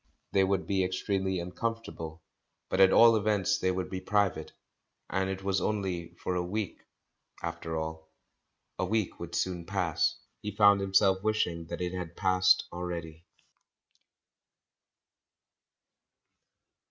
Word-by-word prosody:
They 95 - +4
would 95 -1 +1
be 95 -1 +1
extremely 95 +1 -1
uncomfortable, 90 -4 -5 0.5
but 95 - +2
at 95 0 +7
all 115 0 +7
events 105 -2 +1
they 95 - +1
would 95 0 -1
be 95 -1 -5
private, 100 0 0 0.6
and 95 0 0
it 95 0 -4
was 95 -1 0
only 90 -5 -2
for 90 - -3
a 90 - 0
week, 100 +1 -4 0.6
after 80 0 -4
all. 80 0 -5 0.7
A - - +1
week 110 0 -1
would 85 0 -6
soon 90 -1 -1
pass. - - 0 0.2
He 105 -2 -5
found 100 -1 +6
himself 95 0 +3
wishing 90 -6 0
that 85 +1 -5
it 90 0 -2
had 90 -2 -5
passed 95 -1 +4
already. 85 -2 -6
95 Hz, 130 wpm, -30 LUFS, 85-100 Hz, 0.7 s, at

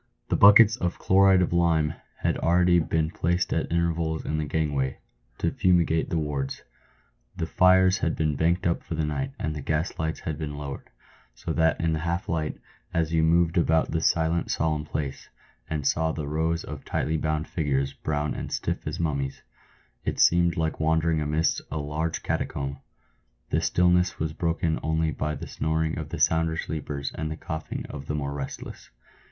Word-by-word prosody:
The - - +2
buckets 105 +2 +7
of 90 -4 -2
chloride 95 -1 +5
of 90 - -1
lime 80 -3 +2 0.3
had - - +1
already 90 +1 +4
been 80 -1 0
placed 90 +2 0
at - - -1
intervals 85 -1 0
in 80 - -1
the 75 - -1
gangways 75 -4 -1 0.4
to - - 0
fumigate 85 -3 +2
the 85 - 0
wards; 70 -3 -3 0.7
the - - -1
fires 95 +2 +4
had 80 - 0
been 75 -2 0
banked 85 +5 +1
up 85 -1 +1
for 80 - -5
the 80 0 0
night, 135 - -3
and 75 - -2
the 75 - -5
gas 75 +5 -2
lights 80 0 -2
had 80 -2 -4
been 75 -2 -4
lowered, 70 -2 -7 0.5
so - - -4
that 80 0 +2
in 80 -1 +1
the 80 - -1
half 85 +3 -2
light, 80 -2 -2 0.3
as 80 -1 0
you 80 - +3
moved 85 +1 +3
about 80 -1 +2
the 80 - 0
silent, 80 +1 +1
solemn 75 -1 0
place, 70 -3 -4 0.4
and 75 -2 -3
saw 80 +3 +2
the 75 -2 -4
rows 80 +2 0
of 75 -3 -8
tightly 80 - -1
bound 75 0 -1
figures, 70 -4 -1
brown 75 -1 -2
and - - -6
stiff - - -3
as - - -4
mum 75 -4 0
mies, 70 0 -4 0.6
it - - -3
seemed 85 0 +4
like 80 -1 -1
wandering 80 0 +2
amidst 75 +2 +1
some 75 - -3
large 80 +2 -3
catacomb. 70 0 -2 0.7
The - - +2
stillness 90 +1 +2
was 80 -1 -2
broken 80 -1 0
only 80 0 0
by 75 0 -2
the - - -7
snoring 80 +1 -1
of 75 -2 -6
the - - -5
sounder 80 0 +2
sleepers 75 -3 -4
and 80 0 -3
the 80 - -5
coughing 80 -3 -5
of 70 0 -8
the 75 - -2
more 70 -1 -3
restless. 70 -2 -7
80 Hz, 185 wpm, -26 LUFS, 75-85 Hz, 0.7 s, buckets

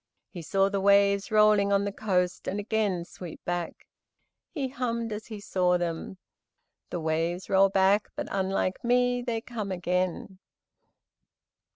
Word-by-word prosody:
He 175 - -7
saw 195 +4 +2
the 200 0 -1
waves 200 +1 +4
rolling 210 -2 +4
on 200 0 +2
the 200 - -2
coast 185 -3 -1
and 200 - -2
again 205 -4 -1
sweep 175 -2 -10
back. 175 -1 -4 0.6
He 275 -5 -3
hummed, 235 -3 -3
as 210 +1 -7
he 215 -2 -7
saw 180 -3 +1
them: 175 +1 -4 0.7
"The 175 - -3
waves 165 +4 -2
roll 195 0 +5
back, 195 +2 +3
but - - -4
unlike 190 -1 -1
me, 245 +1 +2
They 235 -2 -2
come 220 -5 -5
again." 180 +1 -2
195 Hz, 145 wpm, -27 LUFS, 180-215 Hz, 0.7 s, roll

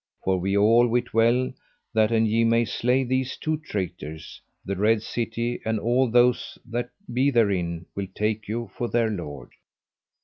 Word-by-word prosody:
For 95 -1 +1
we 95 +3 0
all 115 +4 +5
wit 120 +1 -1
well 120 +3 +3 0.4
that 110 0 +3
an 115 -1 +3
ye 110 +1 +2
may 115 +1 +3
slay 125 +4 +1
these 130 +1 -1
two 155 -1 -1
traitors, 90 - -6 0.2
the 100 - -2
Red 105 +3 +2
City 115 +1 -3
and 110 -1 -1
all 120 +3 +2
those 120 +1 +2
that 120 +1 -3 0.2
be 130 +3 +3
therein 90 -9 +1
will 100 -1 -3
take 110 +1 -1
you 115 +2 -4
for 120 - -2
their 115 -2 +1
lord. 75 - -7
115 Hz, 165 wpm, -25 LUFS, 100-120 Hz, 0.4 s, all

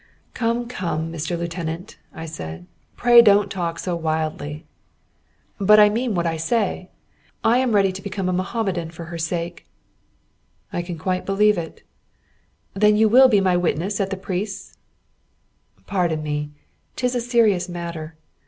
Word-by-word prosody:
"Come, 235 +1 -1
come, 165 -8 -3
Mr. 165 +2 -3
Lieutenant," 170 +2 -5
I 160 - -8
said, 80 - -7 0.3
"pray 240 -1 +7
don't 205 -3 +4
talk 170 -3 -3
so 175 0 -3
wildly." 155 -1 -3 0.9
"But 210 +2 +6
I 210 0 +7
mean 230 0 -1
what 170 -1 0
I 165 -1 -1
say 190 +1 -1 0.5
I 235 +3 +4
am 250 -4 +1
ready 195 -1 +4
to 190 +1 -8
become 195 -1 -4
a 185 - 0
Mohammedan 185 -2 -2
for 170 0 -9
her 170 0 -7
sake." 170 +1 -4 1.1
"I 175 - -1
can 175 -1 -6
quite 185 +3 -2
believe 210 +2 +3
it." 165 -2 -7 0.9
"Then 210 +1 +4
you 220 +1 +4
will 260 +4 +8
be 215 -5 +4
my 185 -2 +2
witness 180 +3 0
at 195 - -1
the 195 - -3
priest's?" 195 +2 -5 1.1
"Pardon 170 -6 -1
me. 150 0 -3 0.5
'Tis 250 0 -1
a 245 - 0
serious 220 -7 +2
matter. 170 -2 -6
185 Hz, 155 wpm, -22 LUFS, 165-210 Hz, 1.1 s, will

